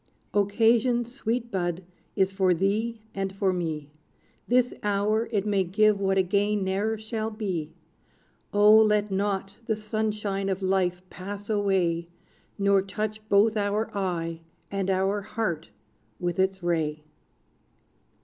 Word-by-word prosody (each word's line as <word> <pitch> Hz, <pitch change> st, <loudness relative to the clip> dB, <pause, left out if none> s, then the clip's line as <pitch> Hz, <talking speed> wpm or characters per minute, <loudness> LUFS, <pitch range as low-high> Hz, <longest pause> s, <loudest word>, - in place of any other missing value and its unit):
Occasion, 230 Hz, +4 st, +3 dB
sweet 240 Hz, -1 st, -3 dB
Bud, 175 Hz, -1 st, -2 dB, 0.3 s
is 190 Hz, -1 st, +2 dB
for 190 Hz, -2 st, +3 dB
thee 215 Hz, +5 st, 0 dB
and 195 Hz, -1 st, -2 dB
for 195 Hz, -1 st, 0 dB
me: 155 Hz, -5 st, -3 dB, 0.6 s
This 245 Hz, 0 st, +3 dB
hour 210 Hz, +2 st, +1 dB
it 205 Hz, -3 st, 0 dB
may 200 Hz, -2 st, +2 dB
give 210 Hz, +3 st, +3 dB
what 195 Hz, -1 st, +1 dB
again 200 Hz, +2 st, +2 dB
ne'er 200 Hz, +4 st, 0 dB
shall 220 Hz, 0 st, -3 dB
be. 190 Hz, -8 st, -3 dB, 0.8 s
O, 210 Hz, +1 st, +6 dB
let 210 Hz, -1 st, +3 dB
not 195 Hz, 0 st, -1 dB
the 220 Hz, -, +1 dB
sunshine 210 Hz, -2 st, -2 dB
of 190 Hz, 0 st, -2 dB
life 185 Hz, -1 st, +1 dB
pass 200 Hz, +3 st, -6 dB
away, 185 Hz, -5 st, +1 dB, 0.5 s
Nor 200 Hz, -1 st, +3 dB
touch 215 Hz, +2 st, -4 dB
both 210 Hz, +2 st, +4 dB
our 205 Hz, +1 st, -1 dB
eye 170 Hz, -4 st, -2 dB, 0.3 s
and 195 Hz, -1 st, -1 dB
our 195 Hz, +2 st, +1 dB
heart 190 Hz, -6 st, -3 dB, 0.5 s
with 175 Hz, +1 st, -2 dB
its 190 Hz, -1 st, +1 dB
ray! 155 Hz, -3 st, -1 dB
200 Hz, 130 wpm, -26 LUFS, 190-215 Hz, 0.8 s, O